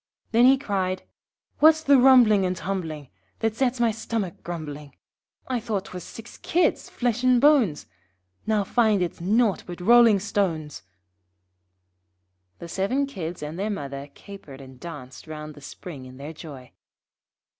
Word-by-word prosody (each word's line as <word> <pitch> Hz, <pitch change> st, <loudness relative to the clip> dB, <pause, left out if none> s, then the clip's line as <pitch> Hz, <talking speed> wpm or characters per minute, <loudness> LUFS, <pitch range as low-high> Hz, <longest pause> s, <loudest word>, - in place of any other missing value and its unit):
Then 235 Hz, +2 st, +5 dB
he 270 Hz, +1 st, +6 dB
cried 190 Hz, -7 st, -2 dB, 0.6 s
'What's 315 Hz, +1 st, +6 dB
the 280 Hz, -2 st, +5 dB
rumbling 245 Hz, -6 st, +6 dB
and 185 Hz, 0 st, 0 dB
tumbling 160 Hz, -5 st, -4 dB, 0.3 s
That 225 Hz, -1 st, -1 dB
sets 255 Hz, 0 st, 0 dB
my 235 Hz, -1 st, +3 dB
stomach 220 Hz, -4 st, -4 dB
grumbling? 150 Hz, -4 st, -7 dB, 0.5 s
I 255 Hz, -2 st, -1 dB
thought 210 Hz, -4 st, -3 dB
'twas 180 Hz, -1 st, -8 dB
six 225 Hz, +1 st, -11 dB
Kids, 340 Hz, -2 st, 0 dB
flesh 245 Hz, -1 st, -1 dB
and 255 Hz, -1 st, +4 dB
bones, 260 Hz, -, +3 dB, 0.6 s
Now 215 Hz, -2 st, +2 dB
find 215 Hz, -3 st, +2 dB
it's 170 Hz, -, -5 dB
nought 210 Hz, +3 st, +2 dB
but 175 Hz, 0 st, -7 dB
rolling 230 Hz, +2 st, +6 dB
stones.' 180 Hz, -7 st, -2 dB, 1.7 s
[Illustration: 90 Hz, -, -47 dB
{The 170 Hz, -, -9 dB
Seven 200 Hz, -, 0 dB
Kids 175 Hz, -, -6 dB
and 155 Hz, +4 st, -6 dB
their 205 Hz, +2 st, -1 dB
mother 140 Hz, -7 st, -5 dB
capered 195 Hz, -10 st, -12 dB
and 130 Hz, -2 st, -13 dB
danced 145 Hz, -5 st, -10 dB
round 155 Hz, -1 st, -7 dB
the 145 Hz, -, -15 dB
spring 140 Hz, -2 st, -9 dB
in 130 Hz, 0 st, -13 dB
their 145 Hz, +4 st, -8 dB
joy. 145 Hz, -6 st, -11 dB
195 Hz, 150 wpm, -25 LUFS, 155-235 Hz, 1.7 s, he